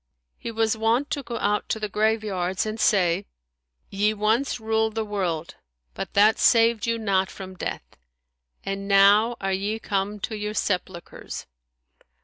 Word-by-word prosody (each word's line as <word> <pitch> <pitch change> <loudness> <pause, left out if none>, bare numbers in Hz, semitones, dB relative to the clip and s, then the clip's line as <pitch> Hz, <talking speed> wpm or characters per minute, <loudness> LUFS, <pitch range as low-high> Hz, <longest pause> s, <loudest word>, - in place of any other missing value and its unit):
He - - -5
was 225 -1 +1
wont 230 +6 +1
to 285 - -1
go 240 -3 -5
out 210 +1 0
to 220 - -1
the 210 - -2
graveyards 210 -4 0
and 215 +1 -4
say, 190 -3 +2 0.6
"Ye 210 +2 +1
once 225 +5 +1
ruled 220 0 0
the 220 -1 -1
world, 180 -6 -3 0.4
but - - -6
that 210 +2 +5
saved 230 -1 +4
you 230 0 +1
not 195 -4 +1
from 190 -1 -9
death, 185 - -5 0.8
and 195 0 -4
now 205 +4 +5
are 195 0 -1
ye 200 +3 -1
come 205 -1 -2
to 220 - -3
your 210 0 -4
sepulchres! 180 -4 -4
210 Hz, 150 wpm, -24 LUFS, 195-220 Hz, 0.8 s, that